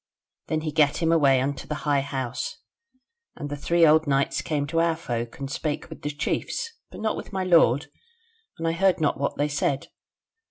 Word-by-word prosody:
Then 155 0 -1
he 155 -1 -3
gat 150 -2 +3
him 165 -1 +1
away 140 -5 +5
unto 140 +1 -2
his 150 0 -3
High 145 -2 +1
House; 130 -3 -4 0.8
and 145 -3 -6
the - - -1
three 170 +3 +3
old 155 0 +5
knights 135 -1 +1
came 150 -3 -1
to 165 +3 -1
our 165 -1 +3
folk, 120 -7 -4
and 140 - -4
spake 150 +2 -3
with - - -9
the 150 - -2
chiefs; 150 - -2 0.2
but - - -10
not 220 - 0
with - - -7
my 190 -2 -1
lord, 160 -6 +4 0.7
and 165 - -2
I - - +2
heard 185 +2 +2
not 150 -4 +1
what 140 - -1
they 145 - +1
said. 140 -2 -1
150 Hz, 200 wpm, -25 LUFS, 140-165 Hz, 0.8 s, away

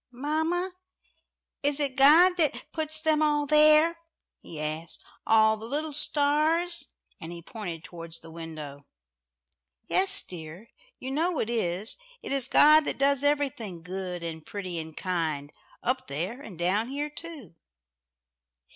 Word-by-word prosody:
"Mamma, 320 +8 -2 0.9
is 285 0 +2
it 280 -3 0
God 310 +7 +7
that 285 -7 +1
puts 315 -1 -1
them 310 -1 +2
all 295 -1 +2
there?" 305 +3 +5 0.4
he 160 - -9
asked. 155 +2 -3 0.2
"All 220 0 +4
the 220 +1 -9
little 300 +4 -3
stars?" 305 +4 +1 0.3
and 160 - -8
he 170 -1 -9
pointed 175 -6 -7
towards 165 -1 -8
the 165 - -13
window. 155 -4 -9 1.0
"Yes, 390 +1 +4
dear. 175 +5 -10 0.3
You 260 - -6
know 325 +4 0
it 230 - -2
is. 200 -2 -1 0.3
It - - -6
is 275 -3 +2
God 305 +1 +6
that - - -1
does 280 0 +3
everything 265 - -1
good 180 -1 -5
and 160 -1 -5
pretty 185 -3 -5
and 160 -1 -9
kind 160 -6 -3 0.3
up 255 +2 -1
there 180 - -4
and 205 - -10
down 190 +7 0
here 290 +3 -4
too." 300 - -9
250 Hz, 140 wpm, -27 LUFS, -, 1.0 s, God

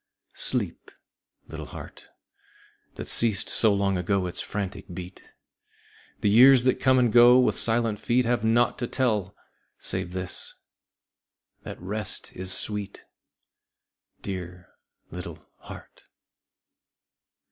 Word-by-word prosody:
Sleep, - - -2 0.6
little - - -8
heart - - -11 0.9
That - - -7
ceased 110 -3 +3
so 110 - +3
long 100 -2 0
ago 95 +1 0
its 90 0 -3
frantic 100 -1 -5
beat! 90 +1 -9 1.0
The 105 - +2
years 125 +3 +7
that 130 0 +1
come 130 -1 +3
and 120 -3 +2
go 120 +1 +7
with 125 - +2
silent 115 -2 0
feet 120 +3 +1
Have 120 -2 0
naught 115 +2 +2
to 120 - -2
tell 105 -8 -1 0.4
save 90 - -4
this 90 -1 -4 1.1
that - - -9
rest 105 +4 -4
is 95 +1 -2
sweet. 100 0 -4 1.2
Dear 90 -2 -7 0.4
little 85 -3 -9
heart. - - -13
105 Hz, 115 wpm, -25 LUFS, 95-120 Hz, 1.2 s, years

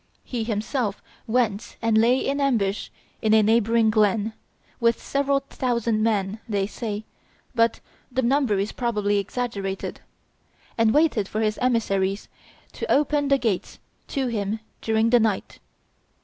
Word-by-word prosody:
He 240 -3 -3
himself 220 0 -2 0.3
went 230 -2 0
and 230 -1 +1
lay 235 +4 +5
in 280 +2 -1
ambush 215 -8 0 0.3
in 220 0 +4
a 220 - +5
neighboring 225 +1 +3
glen, 215 0 +2 0.5
with 235 -1 +2
seven 280 0 0
thousand 235 -3 0
men, 210 -2 0
they 200 -2 +1
say, 215 0 -5 0.5
but 230 -2 +2 0.3
the 260 +1 0
number 255 -4 +2
is 200 +2 -1
probably 210 -4 0
exaggerated, 200 -2 -4 0.7
and 225 -1 +3
waited 280 -8 +2
for 215 - -2
his 215 0 0
emissaries 200 -5 0 0.4
to - - -4
open 290 0 +2
the 275 0 +4
gates 225 -8 -2 0.3
to 270 -1 -1
him 215 -3 -2 0.2
during 225 +1 +2
the 245 - +6
night. 215 -3 -1
225 Hz, 135 wpm, -24 LUFS, 210-245 Hz, 0.7 s, the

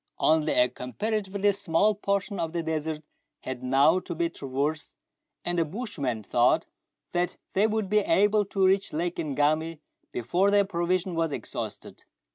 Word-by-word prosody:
Only 155 -1 +3
a 125 - +4
comparatively 205 - -1
small 200 +1 +2
portion 200 0 -2
of 165 -1 -2
the 170 -1 -1
desert 160 -1 -3 0.4
had 130 -1 -5
now 135 +7 +4
to 175 - -6
be 170 +1 0
traversed, 145 +2 -3 0.5
and 175 0 0
the - - +4
bushman 150 - -4
thought - - +3 0.5
that 175 0 -1 0.2
they 205 +3 +3
would 220 -2 -1
be 210 +2 +3
able 205 +1 +3
to 195 0 +1
reach 195 +1 +2
Lake 170 +3 -2
Ngami 155 +2 0 0.3
before 175 - +1
their 200 0 +4
provision 180 0 -1
was 165 -1 0
exhausted. - - -6
170 Hz, 150 wpm, -27 LUFS, 155-200 Hz, 0.5 s, a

